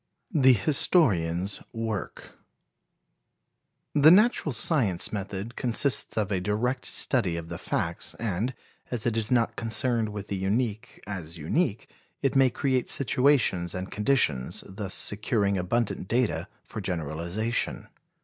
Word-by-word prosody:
The 130 -5 +6
Historian's 100 - +1
Work. 110 -4 -5 1.6
The 150 +1 +7
natural 200 -3 +4
science 110 - +2
method 100 +2 -5
consists 125 +1 +2
of 105 -2 0
a 95 - +1
direct 110 +7 -1
study 95 -10 +1
of 85 0 -7
the - - -6
facts, - - -3
and, 115 +3 -2 0.3
as 120 -4 -3
it 115 -2 0
is 110 -1 0
not 120 -2 +1
concerned 115 -1 0
with 105 -1 -7
the 100 - -2
unique 110 +4 -2
as 90 -5 -6
unique, 105 - -1 0.4
it 135 - +1
may 135 -1 +5
create 130 0 -1
situations 125 -9 +2
and 95 +1 -5
conditions, 105 - +1
thus 95 0 -5
securing 105 -1 0
abundant 95 +2 -1
data 120 +1 0 0.2
for 110 - -7
generalization. 85 +6 -2
110 Hz, 125 wpm, -27 LUFS, 95-125 Hz, 1.6 s, The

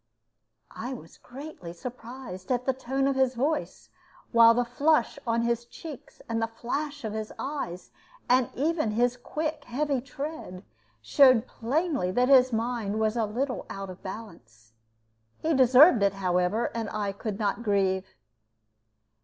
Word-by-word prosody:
I 245 +4 -4
was - - -13
greatly 255 - -9
surprised 240 -1 -8
at 250 0 0
the 265 - +2
tone 265 +1 -2
of 275 - +1
his 260 -1 +2
voice, 290 +5 -2 0.4
while 230 -1 +7
the 245 0 +1
flush 290 +4 +1
on 230 0 +1
his 235 0 0
cheeks 285 +3 -11
and 230 0 -1
the 225 - +1
flash 285 +6 -4
of 215 -2 -3
his 215 0 -4
eyes, 265 -11 -5 0.4
and 255 0 +3
even 310 -2 0
his 240 +3 +1
quick 305 +4 -4
heavy 275 +1 -1
tread, 275 - -7 0.4
showed 255 - +5
plainly 275 - -1
that 250 +4 +2
his 260 -2 +6
mind 225 -2 -1
was 220 0 +1
a 230 -2 +1
little 250 +5 -3
out 195 -1 -6
of 185 - -12
balance. 120 - -10 0.6
He 320 +1 0
deserved 260 - +7
it, 200 -1 +3
however, 185 +3 0
and 225 -3 -3
I 205 -2 -2
could 200 0 -5
not 210 +2 -1
grieve. 195 -3 0
240 Hz, 150 wpm, -27 LUFS, 210-270 Hz, 0.6 s, while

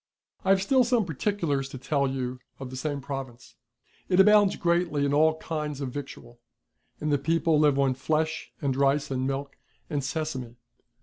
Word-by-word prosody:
I 190 - -1
have 195 0 +4
still 260 +5 +4
some 240 -3 +2
particulars 160 -4 -1
to 135 - -7
tell 140 +1 0
you 130 -1 -3 0.2
of 130 -2 -7
the - - -7
same 140 +2 -3
province. 135 -3 -7 0.6
It 180 - +3
abountls 205 0 +6
greatly 170 -5 +1
in 140 - 0
all 155 +2 +4
kinds 150 -3 -4
of 135 -3 -4
victual; 125 -3 -8 0.6
and 150 0 -1
the 145 - +2
people 160 +1 +2
live 145 -2 +4
on 135 -1 +3
flesh 155 +4 -1
and 135 -2 +1
rice 140 +1 +1
and 130 0 -1
milk 135 +1 -4 0.3
and 145 -2 -1
sesame. 135 -5 -4
145 Hz, 175 wpm, -27 LUFS, 135-160 Hz, 0.6 s, abountls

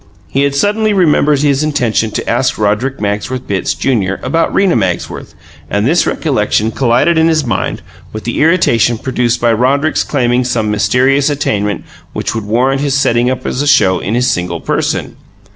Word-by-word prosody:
He 135 - -1
had 140 0 -1
suddenly 210 +6 +1
remembered 150 -6 +2
his 140 -1 +2
intention 125 -7 0
to - - -5
ask 130 +3 0
Roderick 110 +6 -1
Magsworth 105 +5 -3
Bitts, 100 -2 -2
Junior, 100 -8 -1
about 165 +6 0
Rena 195 -2 +2
Magsworth, 95 -6 -3 0.3
and 105 +1 0
this 165 +7 +2
recollection 110 -6 0
collided 130 +8 +2
in 160 - +3
his 155 -3 +1
mind 120 - -2 0.3
with 110 - -7
the 120 - -2
irritation 120 - +2
produced 120 -1 -1
by 120 -1 +2
Roderick's 140 +7 +1
claiming 125 -3 0
some 115 -4 -1
mysterious 130 +7 +2
attainment 105 -8 -1 0.3
which - - -3
would 110 -2 -4
warrant 130 +6 +1
his 140 -2 0
setting 120 -2 +2
up 130 0 -4
as 130 - -2
a 145 - -1
show 120 -10 +3
in 105 +5 -3
his 125 +1 +1
single 90 -8 -2
person. - - -2
125 Hz, 175 wpm, -13 LUFS, 110-140 Hz, 0.3 s, in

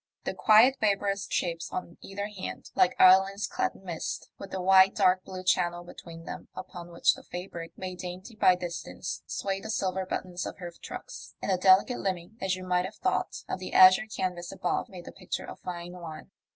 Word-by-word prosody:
The - - -2
quiet 230 +5 +6
vaporous 200 -1 0
shapes 170 -1 -2
on 170 -2 -5
either 200 +1 -5
hand, 205 -3 -7
like 180 - +3
islands 195 +2 +6
clad - - -2
in' - - -16
mist, 170 -4 -5
with 195 - -8
the 190 - -4
wide 190 +1 +6
dark 185 0 +3
blue 185 -1 -7
channel 175 -1 +1
between 165 -1 -11
them - - -7
upon 180 -2 -8
which 170 - +3
the - - -11
fabric, 175 -2 -7
made 185 -1 -6
dainty 185 +5 -7
by 185 -3 +5
distance, 175 -1 -5
swayed 195 -1 -2
the 220 - -6
silver 190 -3 -1
buttons 180 -1 -4
of - - -7
her 175 -3 -7
trucks - - -9
in - - -2
a 185 - +3
delicate 190 +6 +5
limning, 185 +1 -3
as 190 -1 0
you 185 - -8
might 180 0 +1
have 205 +3 -7
thought, - - -1
of - - -3
the 185 - -7
azure 185 +3 +8
canvas 180 -4 -3
above, 180 - -2
made 180 -3 -10
the - - -8
picture 185 - -5
a - - -8
fine 175 -1 -7
one. 170 -3 -9
185 Hz, 200 wpm, -28 LUFS, 175-195 Hz, -, azure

